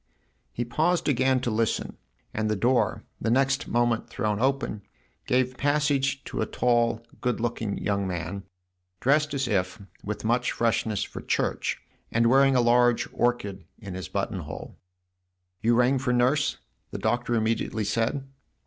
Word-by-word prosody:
He 120 - -3
paused 165 +8 +1
again 130 -2 +2
to 120 - -1
listen, 110 0 -1 0.4
and 110 0 -1
the 110 - +1
door, 120 +5 +1 0.2
the 115 - 0
next 135 +3 +2
moment 120 -1 +1
thrown 105 -1 -1
open, 135 -4 0 0.5
gave 130 0 +1
passage 140 -1 +1
to - - -4
a - - 0
tall, 120 -1 +1 0.2
good 125 0 0
looking 115 -3 -2
young 100 -1 -1
man, 90 +2 -4 0.6
dressed 150 +3 +2
as 135 -2 0
if, 95 -1 0 0.2
with 105 +1 -4
much 120 +2 +1
freshness, 110 -3 0
for - - -7
church, - - -1 0.3
and 115 +1 +2
wearing 135 0 +5
a 125 - +5
large 120 0 +3
orchid 105 -6 -1
in 100 -5 -8
his 90 -3 -5
buttonhole. 95 -6 -4 0.4
" 90 0 -51
You 115 +1 +3
rang 125 +2 +3
for 125 -1 0
Nurse? 130 +4 +2 0.2
" - - -47
the - - -5
Doctor 120 +3 0
immediately 110 0 0
said. 115 +6 -1
120 Hz, 155 wpm, -26 LUFS, 105-130 Hz, 0.6 s, wearing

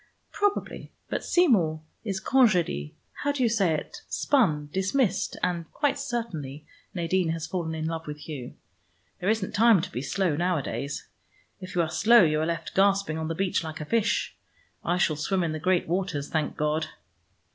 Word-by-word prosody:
"Probably: 410 0 -1 0.2
but - - -1
Seymour 185 - +3 0.2
is 195 -4 -2
congédié 180 - +2 0.3
how 285 - +1
do 280 -3 -1
you - - +4
say 195 -7 +2
it 150 - -6
spun, 155 - +2
dismissed, 195 +2 0
and 170 -3 -1
quite 290 -1 0
certainly 180 - -4 0.3
Nadine 175 0 +1
has 165 -1 -2
fallen 165 -2 -3
in 160 0 -3
love 160 0 -4
with 150 0 -5
Hugh. 135 -6 -7 0.6
There 190 +1 0
isn't 220 -3 0
time 225 -1 +6
to 185 +3 -4
be 125 - -3
slow, 155 +4 0
nowadays. 150 -4 -2 0.5
If 185 0 -8
you 175 - +3
are 160 - -2
slow 235 0 +6
you 155 -2 +2
are 160 - 0
left 165 -1 -3
gasping 195 -4 +2
on 160 - -3
the 165 - -2
beach 190 0 0
like 160 -1 -6
a 150 - -5
fish. 230 +5 0 0.5
I 175 - +1
still 165 -3 +2
swim 185 +5 0
in 165 - -1
the 155 - -3
great 185 +2 +1
waters, 175 -5 -2
thank 155 -2 -1
God." 155 +1 0
175 Hz, 180 wpm, -27 LUFS, 155-200 Hz, 0.6 s, time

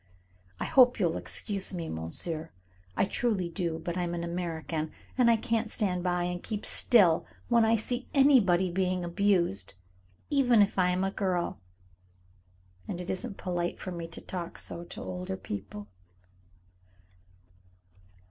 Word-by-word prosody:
I - - -2
hope 250 -2 +5
you'll 170 -4 +1
excuse 195 -2 -3
me, 170 -2 -4
monsieur, 155 - -5 0.5
I - - +4
truly 195 -4 -1
do, 170 -2 -2
but 170 +2 -4
I'm 175 -1 -1
an 170 - -3
American, 165 -2 -3 0.2
and 250 -2 +4
I 230 - +5
can't 225 0 -1
stand 180 -5 -1
by 180 -1 0
and 175 0 -3
keep 215 -2 -4
still 185 -9 +5 0.2
when 235 -1 +5
I 225 +1 +4
see 245 +3 -2
anybody 200 -11 +4
being 185 0 0
abused, 170 - +1 0.6
even 250 -6 +5
if 200 -1 -1
I 180 0 +4
am 180 +1 0
a 195 - 0
girl, 180 - -1 1.3
and 175 - -4
it 180 - -3
isn't 190 +1 -4
polite 175 -1 -2
for 185 - -6
me 170 -1 -5
to 165 - -6
talk 175 -2 -6
so 170 - -4
to - - -8
older 185 +1 -4
people." 105 - -7
180 Hz, 150 wpm, -29 LUFS, 170-205 Hz, 1.3 s, hope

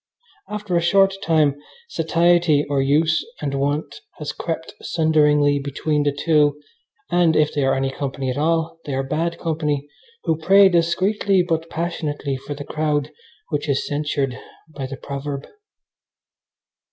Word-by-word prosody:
After 210 -3 -3
a 170 - +3
short 195 +3 +4
time 155 -6 +2 0.3
satiety 170 - +2
or 140 -1 +1
use 155 +4 +2 0.2
and 140 -2 -3
wont 145 +1 -2 0.2
has 150 -1 -4
crept 165 0 -5
sunderingly 150 -3 +3
between 145 +2 -1
the 145 0 +2
two, 150 0 +2 0.5
and, 175 -2 +3
if 150 -1 +2
they 145 - 0
are 135 - +2
any 135 0 -1
company 135 -1 -3
at - - -4
all, 165 +1 0
they 140 - -2
are 135 - 0
bad 165 +5 -2
company, 150 -3 -2 0.4
who 160 -1 0
pray 195 +4 +6
discreetly 185 +3 +2
but 165 -1 -1
passionately 155 -4 -3
for 135 +2 -6
the 145 0 -7
crowd 150 -2 -1 0.4
which 145 0 -2
is 135 - +1
censured 145 -3 -2 0.3
by 140 -4 -6
the 135 0 -7
proverb. 140 +1 -5
150 Hz, 145 wpm, -21 LUFS, 145-165 Hz, 0.5 s, pray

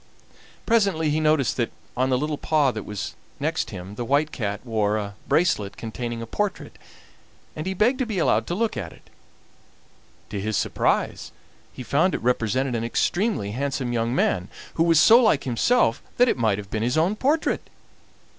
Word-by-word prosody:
Presently 195 -9 +2
he 155 - +1
noticed 155 -4 +2
that 120 -2 0 0.2
on 130 +1 +1
the 130 - +2
little 150 +2 -2
paw 150 -4 +2
that 110 -3 -6
was 105 -2 -5 0.3
next - - -1
him 90 +2 -8
the 120 - -4
White 145 +5 +1
Cat 105 -2 -4
wore 110 -2 0
a 100 -1 -4
bracelet 155 - +1
containing 115 +1 -5
a - - -5
portrait, 205 - -3 0.8
and 155 +3 -5
he 190 - -2
begged 245 +8 +2
to 260 - 0
be 215 -4 -3
allowed 170 - +2
to 175 - -2
look 225 +2 0
at - - -5
it. - - -21 1.2
To - - -3
his 105 +2 -2
great - - +2
surprise - - -1 0.4
he 130 - -8
found 160 +9 +2
it - - -5
represented 125 +2 +1
an 115 -1 -1
extremely 175 - 0
handsome 130 0 -2
young 115 +1 0
man, 90 -7 +1 0.2
who - - -2
was 165 -2 +5
so 230 +8 +7
like 215 - +3
himself 125 - +2 0.2
that 245 - +5
it - - +2
might 110 -5 +1
have 100 -1 -8
been 110 - -2
his 125 +5 0
own 175 +6 +2
portrait! 295 +7 +1
130 Hz, 185 wpm, -24 LUFS, 115-175 Hz, 1.2 s, so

